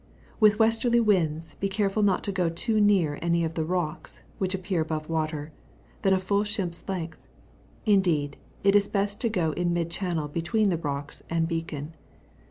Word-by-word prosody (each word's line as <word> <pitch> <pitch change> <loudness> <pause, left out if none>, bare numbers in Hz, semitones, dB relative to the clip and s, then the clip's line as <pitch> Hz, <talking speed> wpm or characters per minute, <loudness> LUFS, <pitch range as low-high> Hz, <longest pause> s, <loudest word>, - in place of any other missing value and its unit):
With 215 -2 +6
westerly 230 +2 +3
winds, 165 -8 +1
be 195 - 0
caraul 200 +1 0
not 195 -2 +2
to 200 - -1
go 180 -3 +1
nearer 195 -4 +2
to - - -8
any 170 0 +2
of 165 0 -2
me 160 - 0
roeksy 175 -1 -3 0.2
which 190 0 0
appear 185 -2 -1
above 155 -1 -3
water, 155 -1 -2 0.5
than 195 - +3
a 190 - +5
full 200 +2 +1
ship's 195 -5 -3
length; 170 -4 -4 0.7
ind^d, 175 -9 +2 0.3
it 200 0 +5
is 200 -1 +4
best 200 0 -1
to 235 - +2
go 175 -7 0
in 175 +1 0
mid 170 -1 -1
channel 170 -4 -2
between 175 +8 +1
the 175 - +1
rocks 145 -2 -4
and 165 0 +1
beacon. 165 -2 -4
175 Hz, 180 wpm, -27 LUFS, 160-200 Hz, 0.7 s, With